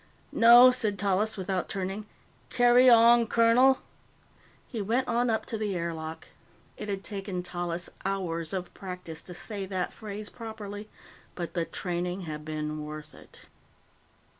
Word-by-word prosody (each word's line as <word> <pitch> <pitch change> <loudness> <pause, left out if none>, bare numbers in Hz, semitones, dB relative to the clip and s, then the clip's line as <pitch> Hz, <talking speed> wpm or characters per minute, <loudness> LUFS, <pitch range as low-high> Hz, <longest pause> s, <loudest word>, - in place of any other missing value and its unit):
"No," 240 +2 +8
said 220 -5 -1
Tallis, 205 +3 +1
without 190 -1 -2
turning. 195 +2 -4 0.4
"Carry 245 +1 +6
on, 235 0 +6
colonel." 235 +4 +4 0.8
He 225 - -5
went 235 +6 0
on 240 +1 +1
up 220 -1 0
to 225 - -4
the 205 -3 -2
air 170 -1 -2
lock. 160 0 -7 0.5
It 210 - -7
had 195 -1 -3
taken 195 -3 -4
Tallis 175 -1 -4 0.2
hours 170 -5 -2
of 185 -2 -4
practice 180 -4 -7
to 180 - -10
say 200 0 -5
that 185 -2 -3
phrase 210 -1 -8
properly, 215 -2 -8 0.5
but 175 -2 -5
the 170 -2 -1
training 180 +1 -3
had 155 -3 -6
been 155 0 -4
worth 150 0 -8
it. - - -16
195 Hz, 145 wpm, -28 LUFS, 175-225 Hz, 0.8 s, No